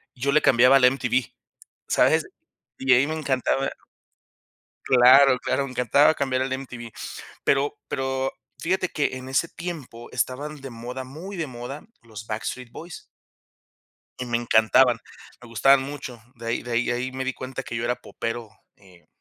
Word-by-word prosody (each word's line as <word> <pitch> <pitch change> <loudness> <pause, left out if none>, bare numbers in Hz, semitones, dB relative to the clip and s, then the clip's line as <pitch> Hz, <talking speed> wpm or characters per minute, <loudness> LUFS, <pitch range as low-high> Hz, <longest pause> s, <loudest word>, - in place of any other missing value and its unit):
Yo 140 +2 0
le 150 - +4
cambiaba 125 +2 +6
al 135 - +1
MTV, 125 -2 +1 0.6
¿sabes? - - +3 0.5
Y 135 - -7
de 130 - +7
ahí 135 +3 +3
me 155 - -3
encantaba 135 -2 0 1.1
claro, 130 +1 +7
claro, 140 - -1
me 135 - -6
encantaba 140 +5 +4
cambiar 130 -3 0
al 130 - -1
MTV. 125 -3 -6 0.5
Pero 140 +1 +1
pero, 135 0 -2 0.3
fíjate 185 +1 0
que 145 -3 -1
en 130 0 -8
ese 140 +5 +1
tiempo 150 -10 -8
estaban 140 +4 -3
de 135 -1 -8
moda, 125 +3 -6
muy 165 +10 -8
de 165 -3 -2
moda, 130 +3 -8 0.2
los 110 -2 -10
Backstreet 115 +3 -5
Boys. 170 +2 -9 1.1
Y 125 - -4
me 120 -1 0
encantaban, 120 +1 +4 0.4
me 120 - -13
gustaban 130 +5 +4
mucho. 135 -4 -7 0.2
De 115 0 -9
ahí 115 - -1
de 120 - -6
ahí 120 +1 +2
de - - +1
ahí 125 +2 -3
me 130 0 -3
di 130 - -1
cuenta 130 +1 -6
que 120 - -6
yo 115 - -2
era 125 +1 0
popero, 115 -1 -5 0.3
eh, 90 -3 -21
130 Hz, 170 wpm, -24 LUFS, 120-140 Hz, 1.1 s, de